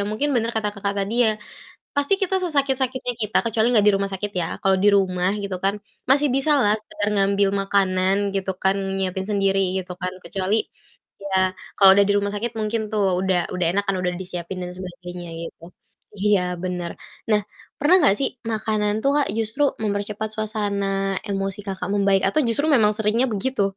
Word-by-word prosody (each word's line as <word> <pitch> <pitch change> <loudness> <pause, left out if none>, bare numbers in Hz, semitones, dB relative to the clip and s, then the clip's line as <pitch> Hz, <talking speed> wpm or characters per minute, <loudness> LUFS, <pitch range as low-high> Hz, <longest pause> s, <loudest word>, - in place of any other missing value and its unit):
mungkin 215 +8 -1
bener 230 -1 +1
kata 210 -1 0
Kakak 200 0 -2
tadi 200 +3 -2
ya, 220 - +4 0.6
pasti 285 +7 +2
kita 385 0 0
sesakit-sakitnya 265 -5 0
kita, 210 0 -1
kecuali 225 0 +2
gak 205 - +3
di 210 - +6
rumah 195 0 -2
sakit 205 +2 -3
ya, - - -1 0.2
kalo 195 0 +3
di 205 - +5
rumah 185 -1 +1
gitu 195 -2 -3
kan 200 +1 +2 0.4
masih 290 +2 +5
bisalah 275 -7 +3
sekedar 210 -1 -4
ngambil 200 0 +2
makanan, 190 -1 +2 0.2
gitu 195 0 -1
kan, 190 0 +3 0.2
nyiapin 190 0 -2
sendiri 195 -1 +2 0.2
gitu 180 -1 -6
kan, 180 0 -2
kecuali 185 +3 -2 0.7
ya 195 -1 -1 0.4
kalau 195 -1 +8
udah 200 - +5
di 205 - +4
rumah 200 0 -2
sakit, 230 +3 -2
mungkin 215 +1 -1
tuh 215 -1 0 0.2
udah 190 -2 +2 0.2
udah 180 -2 0
enak 200 +2 0
kan, 195 - 0
udah 180 - 0
disiapin 180 0 -5
dan 180 - -6
sebagainya, 180 -1 -8 0.2
gitu. 165 - -13 0.5
Iya, 205 0 +3 0.2
bener. 180 -2 -3 0.4
Nah, 210 -1 +4 0.4
pernah 300 +6 +4
gak 200 - +5
sih 270 - +2 0.2
makanan 215 -1 0
tuh, 275 - +3
Kak, 290 - +2
justru 225 +6 0 0.2
mempercepat 205 +1 -2
suasana 210 -2 -2 0.4
emosi 195 -1 -2
Kakak 190 -2 -4
membaik 195 -1 +3
atau 310 - +2
justru 285 +7 +3
memang 215 -5 +4
seringnya 220 +4 +1
begitu? 210 +2 -1
200 Hz, 175 wpm, -22 LUFS, 190-220 Hz, 0.7 s, kalau